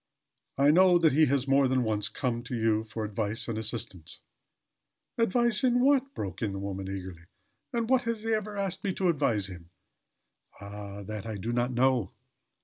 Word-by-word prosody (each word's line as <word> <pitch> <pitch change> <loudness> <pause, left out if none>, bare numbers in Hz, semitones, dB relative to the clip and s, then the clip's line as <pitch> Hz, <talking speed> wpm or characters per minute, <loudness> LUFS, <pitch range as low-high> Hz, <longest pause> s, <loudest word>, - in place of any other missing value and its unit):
I 140 +2 +5
know 180 +2 +6
that 165 -2 +4
he 155 +2 +5
has 140 0 0
more 135 0 +4
than 130 -1 +1
once 105 -2 0
come 120 -3 -2
to 125 - -4
you 110 -1 +1
for 110 0 -5
advice 105 +1 -2
and 115 - -3
assistance 110 -6 -4 0.5
" - - -57
"Advice, 230 0 +2
in 245 -1 +3
what?" 275 +1 +2
broke 95 -3 -5
in 105 -4 -1
the - - -4
woman, 100 -1 -5
eagerly. 95 -3 -7 0.5
"In 235 -1 -1
what 255 +2 +3
has 225 -2 -3
he 225 0 0
ever 210 -1 -2
asked 195 -3 -2
me 195 -2 -1
to 185 -2 +1
advise 130 - +1
him?" 85 -3 -10 0.9
"Ah! 100 0 -8
That 105 +2 -6
I 110 -2 -4
do 115 +5 -3
not 120 +1 0
know. 125 -4 +1
120 Hz, 190 wpm, -28 LUFS, -, 0.9 s, know